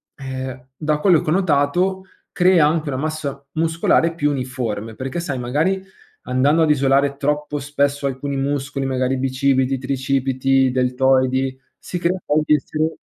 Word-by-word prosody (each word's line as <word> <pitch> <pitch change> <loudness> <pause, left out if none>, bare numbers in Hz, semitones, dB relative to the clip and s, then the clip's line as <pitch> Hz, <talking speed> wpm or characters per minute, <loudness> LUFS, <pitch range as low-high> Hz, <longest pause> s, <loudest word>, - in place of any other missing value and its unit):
ehm, 130 -1 -6
da 155 -1 0
quello 175 -1 +4
che - - -4
ho - - +3
notato 180 +2 +1 0.3
crea 180 -4 +4
anche 155 0 -1
una 130 - -2
massa 145 -2 -4
muscolare 165 +1 +2
più 150 -3 0
uniforme, 125 -5 -4
perché 130 +6 -4
sai, 145 -6 -3
magari 155 +11 0 0.5
andando 140 +6 +2
ad 160 - +3
isolare 140 -1 +2
troppo 150 +1 -1
spesso 140 0 -1
alcuni 140 +1 -3
muscoli, 140 0 -2
magari 130 0 0
bicipiti, 130 0 +1
tricipiti, 135 0 -1 0.2
i - - 0
deltoidi, 130 +1 +1 0.2
si 180 - -6
crea 175 +2 0
poi 150 +1 +2
di 150 - +5
essere 155 +2 -2
140 Hz, 150 wpm, -20 LUFS, 130-155 Hz, 0.5 s, di